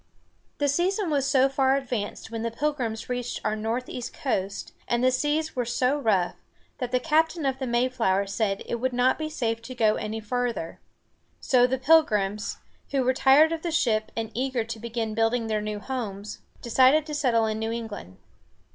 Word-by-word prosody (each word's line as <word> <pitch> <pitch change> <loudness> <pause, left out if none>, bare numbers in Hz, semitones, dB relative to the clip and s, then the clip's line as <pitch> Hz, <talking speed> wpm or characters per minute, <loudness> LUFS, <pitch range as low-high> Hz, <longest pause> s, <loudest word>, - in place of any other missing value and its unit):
The 290 - +1
season 355 +5 +1
was 280 -2 +1
so 270 -1 +4
far 270 0 +2
advanced 245 -6 -4
when 225 -1 -4
the 230 - -1
Pilgrims 240 -3 -2
reached 245 -1 -3
our 215 - +1
northeast 235 +3 -4
coast, 195 -7 -3
and 240 +1 0
the 255 - +5
seas 295 +4 0
were 250 - 0
so 250 +4 0
rough, 200 -9 +1 0.4
that 250 -3 -3
the 250 - +2
captain 320 +2 +1
of 265 -1 0
the 265 - -3
Mayflower 235 -5 +1
said 200 0 -1
it 235 - -2
would 255 +1 -1
not 250 +3 +2
be 310 0 -3
safe 230 -7 -2
to 255 +2 -9
go 220 -3 +3
any 215 +1 -4
farther. 235 -5 -3 0.6
So 250 -2 +4
the 260 +1 0
Pilgrims, 215 -9 +2 0.3
who 275 -2 +1
were 255 +1 +2
tired 280 +5 +5
of 330 -1 -2
the 345 - -2
ship 220 -9 +1
and 225 -1 -3
eager 255 0 -1
to 225 0 -6
begin 230 -1 -3
building 225 +2 +1
their 215 -1 -1
new 210 0 -3
homes, 210 -5 -5 0.2
decided 260 +5 +4
to 305 - -6
settle 245 -6 +2
in 220 0 -2
New 220 0 -2
England. 220 - -6
245 Hz, 185 wpm, -26 LUFS, 220-270 Hz, 0.6 s, the